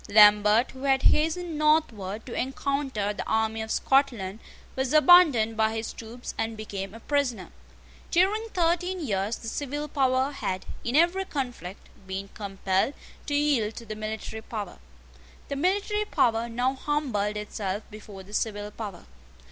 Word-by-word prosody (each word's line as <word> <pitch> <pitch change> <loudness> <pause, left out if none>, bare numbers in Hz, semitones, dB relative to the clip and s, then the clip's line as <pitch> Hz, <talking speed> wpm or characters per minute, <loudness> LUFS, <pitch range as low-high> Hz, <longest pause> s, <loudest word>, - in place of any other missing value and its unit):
Lambert, 210 +2 +6
who 260 +1 -8
had 270 -1 +3
hastened 325 +1 +2
northward 225 -10 +1
to 245 - -7
encounter 265 -5 -1
the - - -4
army 220 0 0
of 220 - -5
Scotland, 225 -8 +1 0.4
was 265 +1 -1
abandoned 305 -9 +6
by 220 0 +1
his 225 0 -4
troops, 235 +2 -8
and 225 0 -2
became 200 -2 -6
a - - -9
prisoner. 250 -7 -1 0.6
During 405 +6 +2
thirteen 355 0 0
years 210 - -1
the 225 - -9
civil 290 +4 -3
power 265 -1 +1
had, 190 -9 -3 0.2
in 240 - -2
every 345 +4 +3
conflict, 245 - -5 0.2
been 195 +1 -5
compelled 195 +4 -1 0.3
to 290 - 0
yield 275 -7 +1
to 235 - -8
the 215 -1 -6
military 220 +1 -5
power. 210 -4 -6 0.7
The 280 - -2
military 405 +7 0
power 230 - +1
now 245 +3 0
humbled 260 -8 -1
itself 210 -1 -4
before 205 -2 -10
the 200 +2 -15
civil 210 -1 -2
power. 205 -5 -7
230 Hz, 150 wpm, -27 LUFS, 210-290 Hz, 0.7 s, Lambert